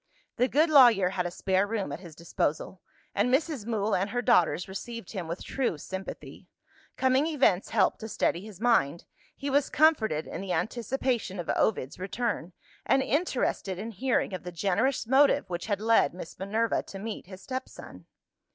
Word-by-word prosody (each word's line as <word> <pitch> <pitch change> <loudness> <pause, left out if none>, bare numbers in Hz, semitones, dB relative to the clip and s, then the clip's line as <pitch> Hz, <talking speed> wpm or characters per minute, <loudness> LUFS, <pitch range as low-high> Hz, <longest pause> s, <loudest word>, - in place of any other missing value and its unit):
The 250 +1 +3
good 310 +5 +2
lawyer 235 -10 +7
had 180 -1 -2
a - - -3
spare 190 +2 0
room 205 -8 -2
at 145 - -5
his 170 -4 -12
disposal; 165 +2 -2 0.3
and 210 +5 +1
Mrs. 275 -5 0
Mool 220 -2 0
and 195 +3 +1
her 245 +3 -2
daughters 175 -3 +3
received 230 +2 -7
him 185 -6 -5
with 170 +3 -5
true 255 - -1
sympathy. 190 +5 -8 0.5
Coming 260 +3 +3
events 270 - +2
helped - - +2
to 220 - -6
steady 180 -4 0
his 205 -3 -11
mind. 190 - +2 0.3
He 280 0 -4
was 280 0 +2
comforted 230 - +3
in - - -6
the 190 -2 -3
anticipation 235 +2 -1
of 170 - -5
Ovid's 150 -10 0
return, 190 -2 -3 0.3
and 270 0 +2
interested 265 - -1
in 220 +4 -5
hearing 235 0 0
of 185 - -4
the 180 - -7
generous 205 +11 0
motive 270 -2 +4
which 175 +3 -4
had 205 -2 0
led 225 -4 +3
Miss 175 -3 -9
Minerva 215 +4 0
to 195 - -10
meet 210 -2 -6
his 190 0 -11
stepson. 260 0 -8
210 Hz, 175 wpm, -28 LUFS, 185-255 Hz, 0.5 s, lawyer